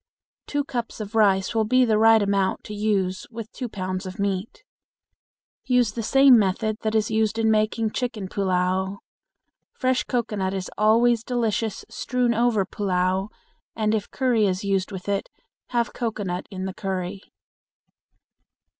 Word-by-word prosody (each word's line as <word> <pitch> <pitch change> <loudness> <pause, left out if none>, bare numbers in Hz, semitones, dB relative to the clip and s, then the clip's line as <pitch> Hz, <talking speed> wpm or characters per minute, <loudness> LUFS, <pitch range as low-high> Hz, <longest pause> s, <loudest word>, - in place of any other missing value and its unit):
Two 290 0 -1
cups 240 -5 -5
of 210 0 -6
rice 195 -3 +3
will 225 -1 +2
be 255 +4 +3
the 215 -2 +2
right 225 -1 +6
amount 195 -1 0
to 210 - -8
use 200 -3 -1
with 230 -1 -8
two 250 -2 -5
pounds 185 -1 -4
of 185 - -8
meat. 200 - -3 1.0
Use 250 -4 +3
the 230 - -4
same 270 +1 +6
method 210 +2 0
that 220 0 -1
is 220 0 +1
used 220 0 +1
in 220 -1 +2
making 215 +1 +1
chicken 230 -6 -3
pullao. 190 0 0 0.8
Fresh 255 -1 0
cocoanut 210 -6 -1
is 185 -1 -4
always 230 +2 +3
delicious 225 -4 -1
strewn 250 -2 0
over 230 -4 +2
pullao, 190 0 -1 0.5
and 215 -1 +1
if 210 -2 -1
curry 240 -5 +2
is 185 +1 -1
used 195 -1 0
with 190 -1 -7
it, 200 -1 -1 0.4
have 240 -1 -1
cocoanut 205 -6 -3
in 190 -2 -5
the 190 - -4
curry. 190 0 -4
215 Hz, 150 wpm, -24 LUFS, 190-230 Hz, 1.0 s, right